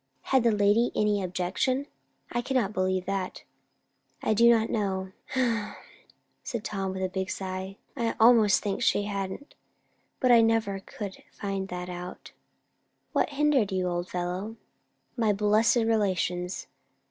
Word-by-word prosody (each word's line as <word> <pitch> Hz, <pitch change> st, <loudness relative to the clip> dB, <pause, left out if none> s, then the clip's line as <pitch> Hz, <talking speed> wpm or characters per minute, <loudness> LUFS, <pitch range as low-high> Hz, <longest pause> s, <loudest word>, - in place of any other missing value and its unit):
"Had 265 Hz, -, +6 dB
the 235 Hz, 0 st, +3 dB
lady 210 Hz, +3 st, +3 dB
any 210 Hz, -1 st, +2 dB
objection? 185 Hz, +9 st, -1 dB, 0.5 s
I 240 Hz, -, 0 dB
cannot 245 Hz, -5 st, 0 dB
believe 185 Hz, -1 st, 0 dB
that." 195 Hz, -1 st, -3 dB, 0.8 s
"I 220 Hz, -, +2 dB
don't 230 Hz, 0 st, +4 dB
know," 190 Hz, -3 st, -1 dB, 1.3 s
said 235 Hz, -3 st, -4 dB
Tom, 195 Hz, -3 st, -3 dB
with 190 Hz, 0 st, -3 dB
a -, -, +2 dB
big 190 Hz, 0 st, -3 dB
sigh. 190 Hz, 0 st, -5 dB, 0.2 s
"I 230 Hz, -4 st, -1 dB
almost 225 Hz, -3 st, +6 dB
think 205 Hz, +1 st, -2 dB
she 205 Hz, -, +3 dB
hadn't; 200 Hz, +6 st, -5 dB, 0.7 s
but 255 Hz, -2 st, +3 dB
I 235 Hz, -1 st, +8 dB
never 225 Hz, -3 st, +1 dB
could 195 Hz, 0 st, -8 dB
find 195 Hz, -1 st, -4 dB
that 180 Hz, -1 st, -5 dB
out." 180 Hz, 0 st, -8 dB, 0.8 s
"What -, -, +2 dB
hindered 280 Hz, -7 st, +2 dB
you, 185 Hz, -1 st, 0 dB
old 175 Hz, 0 st, -2 dB
fellow?" 180 Hz, +5 st, -3 dB, 0.6 s
"My 220 Hz, -4 st, +2 dB
blessed 210 Hz, +3 st, +3 dB
relations. 190 Hz, -6 st, 0 dB
205 Hz, 135 wpm, -28 LUFS, 190-225 Hz, 1.3 s, I